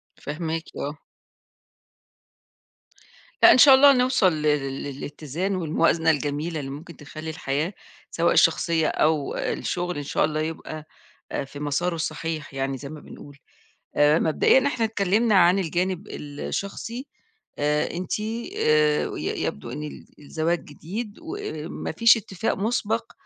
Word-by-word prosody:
فاهماكِ 160 +2 -4
آه. 145 +2 -4 2.5
لأ - - +10
إن - - +6
شاء 270 +1 +9
الله 280 +1 +8
نوصل 250 -8 +3
ل 155 - -3
ل 145 -3 0
للإتزان 150 +6 -4
والموازنة 165 -1 +2
الجميلة 150 +2 -2
اللي 135 -1 -5
ممكن 160 +4 -9
تخلّي 155 +2 -8
الحياة- 155 +3 -2 0.4
سواء - - +2
الشخصية 165 -3 +3
أو 155 -2 +1
الشغل- 180 -1 -2
إن 145 - -3
شاء - - +1
الله 155 0 -2
يبقى 155 -1 -5 0.5
آآ، - - -2
في 145 +1 -10
مساره 150 +4 -1
الصحيح 160 -2 -4
يعني 135 0 -2
زي 140 +1 -8
ما 155 0 -8
بنقول. 145 0 -13 0.6
آآ، 150 +2 +5
مبدئيًا 260 - +3
إحنا 240 -5 0
اتكلمنا 215 +1 +2
عن 180 +1 +5
الجانب 185 +3 -1
الشخصي 200 - -5 0.5
آآ، 150 +1 +1
أنتِ 180 +4 -3 0.4
آآ 150 -1 +3
ي - - -3
يبدوا 70 +12 -4
إن 150 +3 -5
ال 150 - -8
الزواج 160 +3 -2
جديد 205 +9 -6
وما 325 - -5
فيش 230 0 +6
اتفاق 195 -1 -3
مُسبق 225 +2 -1
160 Hz, 135 wpm, -24 LUFS, 150-195 Hz, 2.5 s, لأ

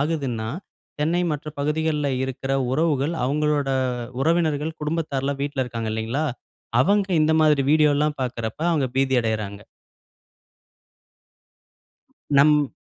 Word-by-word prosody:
ஆகுதுன்னா, 135 -8 -2 0.5
சென்னை 170 +4 +1
மற்ற 150 +1 -5
பகுதிகள்ல 150 0 0 0.2
இருக்குற 135 +1 -4 0.2
உறவுகள் 150 +1 +1
அவங்களோட 145 +1 +1 0.5
உறவினர்கள், 160 -1 +1
குடும்பத்தார்லாம் 140 -3 -2
வீட்டுல 140 -2 -1
இருக்காங்க, 115 -2 -4
இல்லைங்களா? 115 +7 -2 0.6
அவங்க 200 +2 +2
இந்த 155 +1 +3
மாதிரி 150 -3 +4
வீடியோல்லாம் 150 -1 +3
பார்க்குறப்ப, 115 -3 -4
அவங்க 145 -5 +1
பீதி 135 0 +2
அடையறாங்க. 110 -3 -3 2.8
நம் 150 -1 +5
145 Hz, 100 wpm, -23 LUFS, 130-155 Hz, 2.8 s, நம்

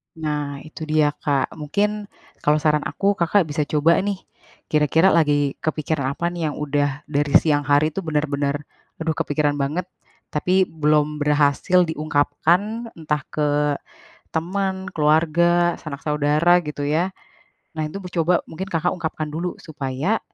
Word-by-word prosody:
Nah, 150 -3 -3
itu 155 0 -8
dia, 155 -1 +3
Kak, 140 -3 0
mungkin 205 +7 -1 0.3
kalau 150 +1 +3
saran 150 -1 +2
aku, 200 +1 +1
Kakak 175 +3 +3
bisa 145 0 -1
coba 155 +3 +3
nih, 200 -1 -2 0.5
kira-kira 160 +5 +4
lagi 145 -4 +2
kepikiran 155 -3 -1
apa 170 +2 -1
nih 170 -3 -2
yang - - -8
udah 145 -1 -1
dari 145 -1 0
siang 145 -3 +1
hari 145 +2 +3
tuh 195 - -4
bener-bener, 145 -2 0 0.5
"Aduh 160 0 0
kepikiran 145 -1 0
banget," 155 +6 -1 0.5
tapi 180 +5 +2
belum 150 -2 +1
berhasil 150 +5 +3
diungkapkan 170 +9 0
entah 150 -2 -1
ke 150 -1 -1 0.9
teman, 190 +3 -2
keluarga, 170 +3 +3
sanak 140 -3 -7
saudara 150 +4 +3
gitu 150 -1 -5
ya. 165 +5 +1 0.7
Nah 155 - 0
itu 175 - -7
bu 180 - -6
coba 170 0 +2 0.2
mungkin, 185 +4 -5
Kakak 175 -1 0
ungkapkan 160 -2 -4
dulu 175 +3 -3
supaya, 150 +6 -2
155 Hz, 140 wpm, -22 LUFS, 145-175 Hz, 0.9 s, kira-kira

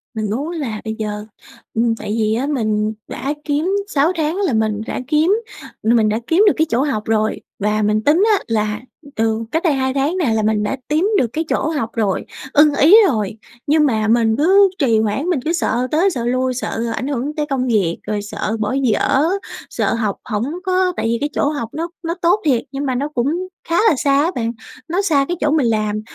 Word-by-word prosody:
Mình 215 -1 -2
muốn 270 +9 -2
là 265 -11 -4
bây 220 0 -3
giờ, 210 -1 -4 0.5
ừm, 230 0 +1
tại 215 -1 -4
vì 215 0 +1
á 260 +5 -1
mình 215 -6 0 0.2
đã 280 +2 -3
kiếm 310 +6 0
6 310 -3 +2
tháng 315 0 -1
là 390 -9 0
mình 220 -1 0
đã - - -3
kiếm 310 +6 +3 0.5
mình 225 -1 +3
đã 215 +1 0
kiếm 345 +5 +4
được 400 - +5
cái 320 - +3
chỗ 235 +3 +1
học 265 -8 -1
rồi. 215 -1 0 0.2
Và 210 +1 0
mình 210 +1 +1
tính 315 - +4
á 400 - +2
là 215 -1 -1 0.3
từ 225 0 0
cách 325 +4 0
đây 330 -5 +3
2 265 -1 0
tháng 280 +6 0
nè 290 -11 +1
là 220 -1 +1
mình 215 0 +1
đã 240 +6 -2
kiếm 305 +3 +1
được 250 - +2
cái 320 - -1
chỗ - - 0
học 285 -8 -2
rồi, 210 -5 -1 0.3
ưng 295 0 +5
ý 320 +10 +7
rồi 215 - -1 0.3
nhưng 300 +1 +4
mà 220 -5 +1
mình 225 -1 +3
cứ 390 +6 +5
trì 235 -7 +3
hoãn, 220 +7 -1
mình 345 -6 +1
cứ 325 - +1
sợ 255 -7 0
tới 340 +6 +3
sợ 245 -10 -3
lui, 255 +1 0
sợ 235 -2 -3
ảnh 255 - -3
hưởng 285 +1 -3
tới 300 - -1
công 260 -2 0
việc, 200 -8 +1
rồi 210 -1 -1
sợ 210 +2 -3
bỏ 215 +2 -1
dở, 255 +3 +2 0.5
sợ - - 0
học 215 -4 -1
hổng 210 -2 -2 0.2
có 370 -1 +1
tại - - -1
vì 230 +1 +1
cái 290 - 0
chỗ 285 - +1
học 285 -7 -4
nó 330 +2 -3 0.2
nó 335 +1 -2
tốt 350 +5 +3
thiệt 255 -6 +3
nhưng 280 +1 -3
mà 260 -2 -1
nó 275 +4 -1
cũng 300 +6 -1 0.2
khá 335 - +1
là - - +2
xa 280 +1 +3
á 335 - 0
bạn. 230 -1 -1 0.4
Nó 355 +4 0
xa 295 -8 +2
cái 350 - -2
chỗ 300 - +1
mình 295 -5 +2
làm, 215 -1 0
255 Hz, 225 wpm, -19 LUFS, 220-305 Hz, 0.5 s, ý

